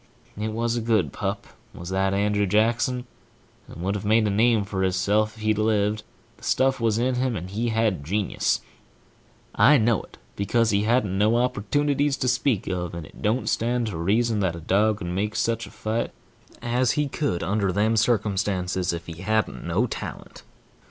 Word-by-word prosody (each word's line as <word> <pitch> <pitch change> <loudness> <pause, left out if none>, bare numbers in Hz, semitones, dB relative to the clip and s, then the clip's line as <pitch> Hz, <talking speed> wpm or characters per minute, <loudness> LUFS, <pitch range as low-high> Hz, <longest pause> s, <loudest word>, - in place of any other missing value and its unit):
It 105 +2 -3
was 115 +2 -1
a 120 - -1
good 110 - +1
pup, - - -3 0.3
was 85 0 -7
that 95 +1 +1
Andrew 105 +1 +1
Jackson, 120 +5 +1 0.6
and 85 - -9
would 95 +2 0
have 105 - -4
made 110 +1 +3
a 105 - +1
name 110 +1 +3
for 100 -1 -3
hisself 105 +3 +1
if 110 - -10
he'd 110 0 +1
lived, 105 -1 +1 0.3
for - - -26
the - - -19
stuff 130 0 +2
was 115 -2 +1
in 125 +2 +1
him, 125 -1 0
and 90 -1 -5
he 115 +4 -1
had 110 -8 0
genius&#8212I 105 - -1
know 115 -1 +2
it, - - -17 0.2
because 115 +3 +1
he 100 +1 +1
hadn't 115 -3 +2
had 95 - -2
no 110 +3 +3
opportunities 140 +5 +1
to 130 - -1
speak 125 -3 +1
of, 90 -2 -3
and 85 -2 -6
it - - -15
don't 110 +5 0
stand 120 +1 0
to 90 - -5
reason 110 +6 +1
that 95 -4 0
a - - -7
dog 100 +6 +2
could 100 - -7
make 100 +5 -2
such 115 0 -1
a - - -11
fight 110 +2 -2 0.5
as 120 +1 +1
he 150 -1 0
could 130 - -2
under 100 -1 0
them 105 +4 +1
circumstances, 95 -5 0
if 85 +1 -5
he 85 0 -9
hadn't 110 -2 -1
no 95 +8 +1
talent. 120 - -7
110 Hz, 190 wpm, -24 LUFS, 95-115 Hz, 0.6 s, made